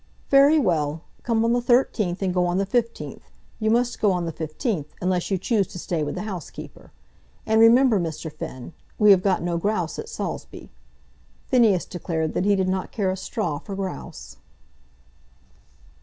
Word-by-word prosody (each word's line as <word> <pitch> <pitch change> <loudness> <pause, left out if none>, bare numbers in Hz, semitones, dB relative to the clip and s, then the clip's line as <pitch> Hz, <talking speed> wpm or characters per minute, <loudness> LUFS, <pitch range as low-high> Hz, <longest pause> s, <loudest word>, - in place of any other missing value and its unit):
"Very 280 +3 +6
well; 160 - 0 0.2
come 230 -1 +1
on 230 - +2
the 245 - +1
13th 225 -7 +1
and 185 -2 0
go 180 -1 +2
on 175 +1 0
the 195 - +1
15th. 230 +3 -2 0.4
You 220 -1 +1
must 240 +2 +1
go 205 - +4
on 180 -2 -1
the 165 - -4
15th, 160 - -3
unless 180 -1 -1
you 195 - +1
choose 200 0 0
to - - -10
stay 170 -2 -2
with 145 - -3
the 180 - -4
housekeeper. 190 -7 -8 0.5
And 220 0 +3
remember, 235 -1 +6
Mr. 160 -2 -4
Finn, 130 +5 -8 0.2
we 210 -1 +6
have 190 -2 +6
got 185 -3 +1
no 170 -1 -1
grouse 180 -3 -1
at 450 - -6
Saulsby." - - -6 0.8
Phineas 225 -8 +4
declared 160 -3 -3
that 185 - 0
he 205 0 +4
did 190 -1 0
not 185 0 -2
care 195 -4 0
a - - -2
straw 190 -6 -3
for 200 - -7
grouse. 190 -1 -7
190 Hz, 175 wpm, -24 LUFS, 175-225 Hz, 0.8 s, Very